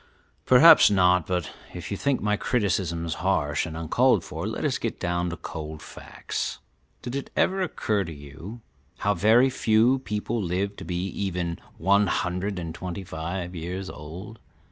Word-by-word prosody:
"Perhaps 155 +6 +8
not; 90 -3 +3
but 90 -4 -2 0.2
if 90 +2 -7
you - - 0
think 140 +5 0
my 105 0 +1
criticisms 90 - -1
harsh 80 -5 +1
and 80 0 -6
uncalled 80 -1 +2
for, - - -5
let - - -3
us - - 0
get - - -3
down 85 0 -1
to 85 - -5
cold 80 -1 -7
facts. - - -5 0.5
Did 120 +2 -5
it 140 - -4
ever 190 +1 +2
occur 105 - 0
to 85 - -7
you 80 +10 -10 0.4
how 105 - +1
very 120 +6 +4
few 115 +3 +3
people 105 0 -3
live 95 +2 -1
to - - -8
be 90 +1 -2
even 90 -4 -3 0.2
one 100 +4 +3
hundred 90 +3 -1
and 85 -2 -5
twenty 90 +2 -6
five 90 +1 -5
years 90 +3 -5
old? 90 +9 -9
95 Hz, 165 wpm, -26 LUFS, 85-105 Hz, 0.5 s, Perhaps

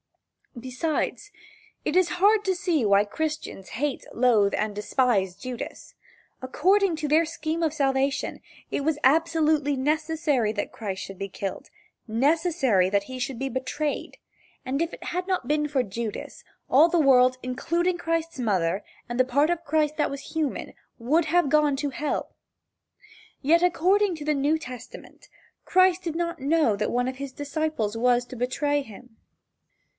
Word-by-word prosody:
Besides, 295 - -3 0.5
it 300 - -1
is 370 -1 +4
hard 415 +2 +4
to 380 -1 +1
see 345 -6 0
why 200 0 +4
Christians 305 -5 -4
hate, 280 +3 -2
loathe 225 -5 +3
and 210 -1 -2
despise 210 -4 +1
Judas. 250 +1 -7 0.5
According 365 +8 +2
to 305 -1 -2
their 310 +3 +4
scheme 330 0 -3
of 315 -2 +1
salvation, 270 -2 0 0.3
it - - -1
was 310 0 +1
absolutely 310 -1 +3
necessary 300 -4 0
that 205 - -3
Christ 195 -4 -5
should 195 -1 -9
be 195 - -4
killed 195 0 -6 0.4
necessary 270 - +2
that 200 0 +1
he 255 +5 -8
should 250 -1 -3
be 270 - -1
betrayed, 265 +4 -3 0.5
and 270 +4 -1
had 350 +1 -3
it - - -24
not 370 -10 -1
been 300 +1 +1
for 275 -3 0
Judas, 220 +1 -6 0.3
all 305 +6 +6
the 345 - +2
world, 255 -3 +5
including 340 +8 -1
Christ's 330 -3 -2
mother, 190 -5 0 0.2
and 240 +1 -4
the - - +7
part 280 +5 +2
of 340 -1 -2
Christ 305 -1 0
that 295 - +1
was 280 0 -8
human, 315 -4 -2 0.2
would 300 +8 +1
have 345 0 +2
gone 300 0 +3
to 285 0 -2
hell. 295 +2 -3 1.1
Yet, 335 +5 +4
according 365 +2 +3
to 295 - -7
the 305 - +2
New 290 +3 +1
Testament, 250 -5 -11 0.3
Christ 370 0 +3
did 330 -2 -3
not 340 0 -2
know 285 -4 +2
that 210 +1 -2
one 245 +1 0
of 260 0 -4
his 275 0 -6
disciples 290 -6 -2
was 245 +1 +2
to 255 - -10
betray 285 +4 0
him. 225 -1 -13
285 Hz, 160 wpm, -25 LUFS, 245-320 Hz, 1.1 s, the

